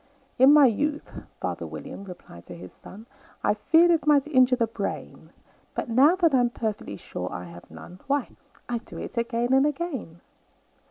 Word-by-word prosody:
"In 265 +2 +8
my 295 -1 +7
youth," 290 +6 -1 0.3
father - - -4
William 200 - -9
replied 175 - -12
to 90 - -9
his 90 +1 -11
son, 215 +4 -13 0.4
"I - - +3
feared 325 +11 +4
it 325 -3 +1
might 290 -2 +4
injure 255 -4 +4
the 235 -2 +1
brain; 220 -3 -6 0.5
But, - - -3
now 275 +9 +5
that 340 -5 +2
I'm 245 -2 +3
perfectly 215 - -5
sure 90 -1 -6
I 90 - -6
have 85 0 -13
none, 180 +1 -12
Why, 280 -2 0 0.4
I 240 -1 -2
do - - -12
it - - -7
again 235 +1 -1
and 270 +2 +4
again." 275 - -5
245 Hz, 175 wpm, -25 LUFS, 200-290 Hz, 0.5 s, In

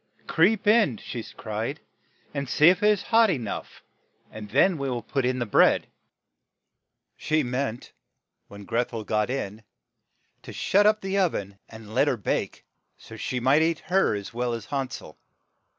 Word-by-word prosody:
"Creep 195 +6 +2
in," 210 - +4
she - - -6 0.2
cried, - - -4 0.5
"and 140 -3 -4
see 150 +6 +6
if 185 +2 +2
it 210 - +4
is 210 -3 +2
hot 230 -1 +4
e 175 - +1
nough, 115 -5 -7 0.5
and 105 -1 -9
then 185 - +3
we 140 -1 -2
will 120 -2 -3
put 135 -2 -2
in 130 0 0
the 120 - -1
bread." 105 - +4 1.3
She 155 0 0
meant 125 -1 -3 0.6
when 100 0 -12
Greth 120 +3 -1
el 110 -1 -4
got 105 +1 0
in 110 -5 -4 0.8
to - - -10
shut 205 +2 +2
up 215 0 +3
the 195 +1 -1
o 185 -2 +3
ven 100 -6 -6
and 110 -1 -12
let 130 +5 +3
her 130 - +1
bake, 105 - -3 0.3
so - - -14
that - - -9
she 125 - -2
might 135 +5 +3
eat 165 0 +1
her 190 - +3
as 100 +1 -7
well 120 0 -2
as 115 -2 -5
Han 135 0 -3
sel. - - -10
130 Hz, 180 wpm, -25 LUFS, 115-180 Hz, 1.3 s, see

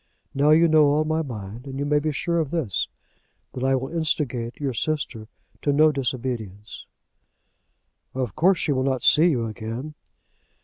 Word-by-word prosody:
Now 145 +2 +2
you 165 +2 +6
know 155 -2 +5
all 150 +2 +2
my 155 +1 0
mind, 115 -2 -7
and 135 0 -6
you 140 - -2
may 150 0 +2
be 155 +1 -1
sure 170 +4 -1
of 155 -4 -1
this, 140 - -1 0.7
that 125 - -5
I 135 0 +3
will 130 +1 -3
instigate 130 -7 -1
your 140 -3 -2
sister 125 -5 -3 0.3
to 145 - +1
no 155 +2 +5
disobedience." 120 -7 -4 1.3
"Of 125 -6 -3
course 185 +2 +4
she 150 - 0
will 130 -2 +1
not 130 -2 -1
see 160 +3 +6
you 120 -7 0
again." 115 +6 -6
135 Hz, 170 wpm, -24 LUFS, 120-155 Hz, 1.3 s, you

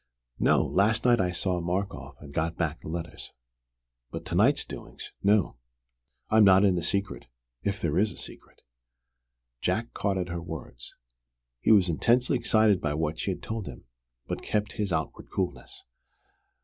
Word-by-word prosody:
No, - - +4
last 110 +5 +2
night 120 -3 +5
he 90 - 0
saw 90 0 -1
Markoff 95 +4 -3
and 70 -2 -11
got 80 +2 -1
back 80 -2 -1
the - - -10
letters. 85 +1 -6 0.8
But - - -7
to - - -6
night's - - +3
doings - - -9
no. 100 - +2 0.7
I 110 - +2
am 110 - +8
not 95 0 +7
in 95 - +4
the 90 - -1
secret 100 0 -2 0.3
if 100 0 -2
there 85 +1 0
is 105 +1 +2
a - - -12
secret." - - -13 1.0
Jack 115 +1 -1
caught 100 -2 -1
at 90 -1 -2
her 85 0 -4
words. 80 -7 -8 0.6
He 65 - +2
was 100 -4 +6
intensely 120 - +2
excited 110 -5 +3
by 75 -2 -1
what 80 0 -2
she - - -2
had 95 - -4
told 110 -3 -4
him, 65 - -9 0.4
but - - -4
he - - -11
kept 105 0 0
his 105 -4 -2
outward - - -3
coolness. 100 - -4
95 Hz, 175 wpm, -28 LUFS, 85-105 Hz, 1.0 s, am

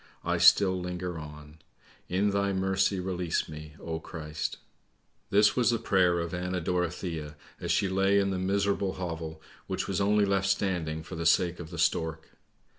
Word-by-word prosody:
I 85 0 +1
still 95 +2 +6
linger 90 -1 -4
on. 75 0 -11 0.5
In 100 +3 +2
Thy 100 0 +1
mercy 95 +1 +1
release 90 -2 -1
me, 75 0 -9
oh 80 -1 -4
Christ! 75 -2 -5 0.2
' - - -43
" - - -43
This 105 +1 +4
was 125 -2 +3
the 120 - +2
prayer 90 -5 +2
of 85 0 -3
Anna 90 +1 -2
Dorothea, 85 -3 -2 0.2
as - - -2
she 100 - +2
lay 95 +1 +2
in 100 -1 +2
the 95 - -2
miserable 100 0 0
hovel 80 -3 -5 0.2
which - - -2
was 95 0 -1
only 105 +1 +3
left 95 -1 +1
standing 90 -5 -1
for 80 - -10
the 85 0 -1
sake 90 -1 +3
of 80 -2 -7
the 85 - -8
stork. 80 -1 0
90 Hz, 180 wpm, -29 LUFS, 80-95 Hz, 0.5 s, still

